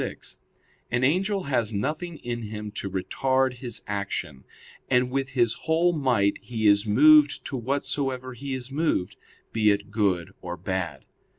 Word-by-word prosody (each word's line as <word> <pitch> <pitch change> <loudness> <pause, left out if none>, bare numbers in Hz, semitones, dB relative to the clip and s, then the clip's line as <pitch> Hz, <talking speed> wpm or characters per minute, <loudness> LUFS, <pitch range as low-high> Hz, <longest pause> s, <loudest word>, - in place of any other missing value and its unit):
6), - - -6 0.5
an 125 +1 0
angel 190 +7 +1
has 120 -6 0
nothing 155 - -3
in 120 -3 -4
him 105 -1 -6
to 100 -1 -4
retard 130 +7 0
his 120 -3 -3
action, 100 -9 -4 0.4
and 125 0 +2
with 135 0 -1
his 120 -2 +4
whole 165 +2 +3
might 125 -10 +1
he 115 -3 -4
is 100 +1 +4
moved 145 +6 +6
to - - -4
whatsoever 130 0 -2
he 135 +2 -5
is 130 0 -6
moved, 145 - 0 0.4
be 110 -2 +3
it 100 0 0
good 95 -4 0
or 90 -1 -5
bad. 90 -1 -3
120 Hz, 155 wpm, -26 LUFS, 100-140 Hz, 0.5 s, moved